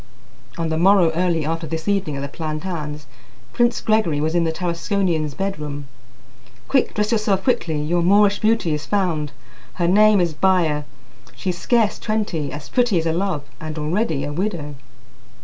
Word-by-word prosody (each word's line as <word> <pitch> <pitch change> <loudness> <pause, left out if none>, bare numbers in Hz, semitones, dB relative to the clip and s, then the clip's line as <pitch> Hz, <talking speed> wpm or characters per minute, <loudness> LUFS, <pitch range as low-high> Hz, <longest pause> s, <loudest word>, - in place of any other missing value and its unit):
On 165 -1 -1
the 160 0 -1
morrow 185 -2 +5
early 165 -2 0
after 165 +1 -2
this 160 +3 -5
evening 195 -7 0
at - - -4
the - - -2
Platanes, 155 -1 -5 0.5
Prince 240 0 +2
Gregory 215 -9 +1
was 155 +2 0
in 170 -1 +2
the 160 - +1
Tarasconian's 170 -2 -1
bedroom. 150 -7 -4 0.8
"Quick! 265 -2 +1
Dress 210 0 0
yourself 210 -4 +1
quickly! 165 - 0
Your 170 +4 0
Moorish 200 +3 +4
beauty 220 -7 +2
is 150 0 -4
found, 170 -8 0 0.4
Her 175 -2 0
name 210 +2 +5
is 170 -3 +1
Baya. 160 -4 +2 0.5
She's 180 -3 -3
scarce 230 -1 +1
twenty 205 -9 -2
as 145 0 -7
pretty 240 -6 +2
as 165 - 0
a 165 - +1
love, 175 -4 -1 0.2
and 155 0 -6
already 155 -1 -1
a 145 +1 -4
widow." 170 -4 -3
170 Hz, 165 wpm, -21 LUFS, 155-200 Hz, 0.8 s, morrow